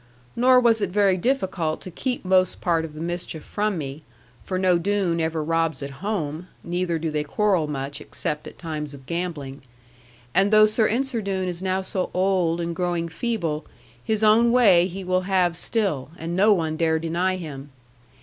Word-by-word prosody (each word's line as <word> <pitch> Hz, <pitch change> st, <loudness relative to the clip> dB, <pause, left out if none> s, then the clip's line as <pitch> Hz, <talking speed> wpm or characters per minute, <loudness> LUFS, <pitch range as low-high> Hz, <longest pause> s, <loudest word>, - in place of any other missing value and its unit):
Nor 250 Hz, +1 st, +5 dB
was 230 Hz, -3 st, +3 dB
it 200 Hz, -, 0 dB
very 195 Hz, 0 st, +3 dB
difficult 185 Hz, -7 st, -1 dB
to 185 Hz, -, -8 dB
keep 250 Hz, +4 st, -3 dB
most 185 Hz, -1 st, +3 dB
part 165 Hz, -2 st, +1 dB
of 155 Hz, -2 st, -10 dB
the -, -, -8 dB
mischief 170 Hz, -2 st, -4 dB
from 210 Hz, -2 st, -1 dB
me, 140 Hz, 0 st, -5 dB, 0.4 s
for 185 Hz, -, -3 dB
no 185 Hz, -2 st, +3 dB
Doone 190 Hz, -2 st, 0 dB
ever 160 Hz, -1 st, -1 dB
robs 165 Hz, -2 st, 0 dB
at 140 Hz, +1 st, -8 dB
home, 175 Hz, -5 st, -3 dB, 0.2 s
neither 175 Hz, -1 st, -1 dB
do 160 Hz, 0 st, -3 dB
they 150 Hz, -1 st, -1 dB
quarrel 185 Hz, +1 st, +1 dB
much, 140 Hz, 0 st, -4 dB
except 150 Hz, 0 st, -4 dB
at -, -, -11 dB
times 150 Hz, -3 st, -5 dB
of 135 Hz, -1 st, -14 dB
gambling. 160 Hz, -5 st, -4 dB, 0.7 s
And 195 Hz, +1 st, +4 dB
though 215 Hz, 0 st, +7 dB
Sir 215 Hz, +1 st, +2 dB
Ensor 250 Hz, 0 st, 0 dB
Doone 190 Hz, -2 st, -2 dB
is 175 Hz, -1 st, -4 dB
now 190 Hz, 0 st, -1 dB
so 185 Hz, -1 st, -2 dB
old 180 Hz, -3 st, +1 dB
and 170 Hz, 0 st, -3 dB
growing 175 Hz, -1 st, -1 dB
feeble, 165 Hz, -7 st, -2 dB, 0.4 s
his 220 Hz, -1 st, 0 dB
own 225 Hz, +2 st, +5 dB
way 195 Hz, -8 st, +5 dB
he 190 Hz, +1 st, -7 dB
will 185 Hz, 0 st, +1 dB
have 180 Hz, -3 st, +2 dB
still, 175 Hz, -, -1 dB
and 165 Hz, +1 st, -4 dB
no 205 Hz, +4 st, +5 dB
one 160 Hz, -5 st, +1 dB
dare 160 Hz, -1 st, +2 dB
deny 170 Hz, +3 st, 0 dB
him. 145 Hz, -6 st, -7 dB
175 Hz, 185 wpm, -24 LUFS, 160-200 Hz, 0.7 s, though